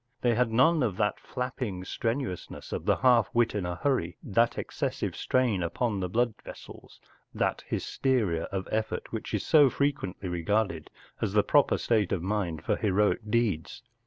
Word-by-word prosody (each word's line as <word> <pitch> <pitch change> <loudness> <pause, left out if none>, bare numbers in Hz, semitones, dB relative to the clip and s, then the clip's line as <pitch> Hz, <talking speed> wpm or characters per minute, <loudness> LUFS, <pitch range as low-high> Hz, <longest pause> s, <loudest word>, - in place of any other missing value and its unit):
They 120 -1 +3
had 120 0 +1
none 150 +8 +4
of 105 -7 0
that 105 -1 0
flapping 120 -7 -4
strenuousness 115 -2 -4
of - - -4
the - - +4
half 120 -5 +4
wit 120 -1 +3
in 100 -4 -2
a 90 - -3
hurry, 125 - -1
that 115 +3 +1
excessive - - -3
strain 125 -7 +1
upon 100 +5 -1
the 90 -1 -2
blood 120 +4 +1
vessels, - - -12 0.4
that - - 0
hysteria 105 -12 0
of 95 -1 -4
effort 110 0 -2
which - - -5
is - - -2
so 145 -3 +6
frequently 135 -10 -2
regarded 90 -1 -1 0.3
as 105 -3 -1
the 105 -1 +4
proper 145 -2 +3
state 110 -6 +1
of 90 -4 -1
mind 95 -5 -2
for - - 0
heroic 105 +2 +1
deeds. 105 -8 -1
110 Hz, 165 wpm, -28 LUFS, 95-125 Hz, 0.4 s, so